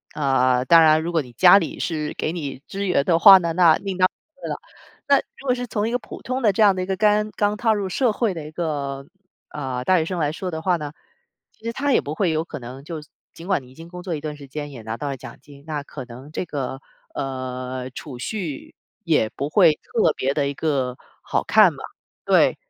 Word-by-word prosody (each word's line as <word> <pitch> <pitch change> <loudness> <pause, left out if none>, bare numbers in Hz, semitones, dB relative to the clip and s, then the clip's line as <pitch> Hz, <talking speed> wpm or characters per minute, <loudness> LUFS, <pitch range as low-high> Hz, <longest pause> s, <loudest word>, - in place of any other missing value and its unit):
呃 130 -3 +2
当 165 +3 +7
然 155 0 +5
如 170 - -3
果 165 -2 +2
你 125 -3 -12
家 180 - +7
里 165 - -5
是 155 -3 -3
给 - - -1
你 140 -5 -6
支 200 +1 -3
援 140 -6 +2
的 165 -2 +3
话 195 +2 +10
呢， 170 -3 -1
那 170 -2 +6
另 195 -1 -5
当 185 - +6 0.3
别 275 - -28
论 - - -5
了。 - - -4 0.5
那 280 0 +6
如 270 - -8
果 255 - +3
是 245 0 -4
从 215 -2 -1
一 - - -2
个 245 - 0
普 - - -11
通 255 +3 -2
的 215 -4 +4
这 205 +3 +2
样 200 -2 +5
的 185 - -2
一 - - -2
个 190 - 0
干 210 0 +3
刚 205 0 +1
踏 225 0 +2
入 200 -2 -2
社 235 +6 +1
会 215 -1 0
的 160 -3 -7
一 - - -10
个， 140 -4 -3 0.5
呃， 130 -4 -4
大 185 -1 +4
学 160 - 0
生 180 +2 -3
来 150 -2 +1
说 180 +4 -5
的 160 -2 -5
话 180 -1 +2
呢， 150 -2 -6 0.6
其 - - -32
实 230 - -2
它 280 +3 0
也 - - +4
不 150 - -5
会 180 -1 +1
有 160 0 0
可 165 -2 -8
能 130 +1 -9
就 160 0 -6 0.3
尽 165 - -10
管 190 -5 +1
你 125 - -16
已 - - -18
经 165 +3 -11
工 180 +1 -9
作 175 -2 -3
一 - - -4
段 150 -1 -5
时 145 -2 -12
间 145 +1 -6
也 125 -4 -9
拿 110 +1 -5
到 145 +2 -4
了 135 - -3
奖 - - -10
金， 140 -1 -15
那 150 -2 -3
可 135 -2 -8
能 125 +5 -12
这 - - -3
个， 135 -4 -4 0.3
呃， 130 -1 -4
储 130 -1 -9
蓄 165 - -5 0.3
也 110 - +2
不 140 - -3
会 170 -2 +5
特 220 -3 +1
别 135 +1 0
地 145 -1 0
一 - - -4
个 135 -5 -1 0.3
好 - - 0
看 - - +6
吧， - - -9 0.4
对。 - - +4
160 Hz, 270 characters per minute, -22 LUFS, 140-190 Hz, 0.6 s, 话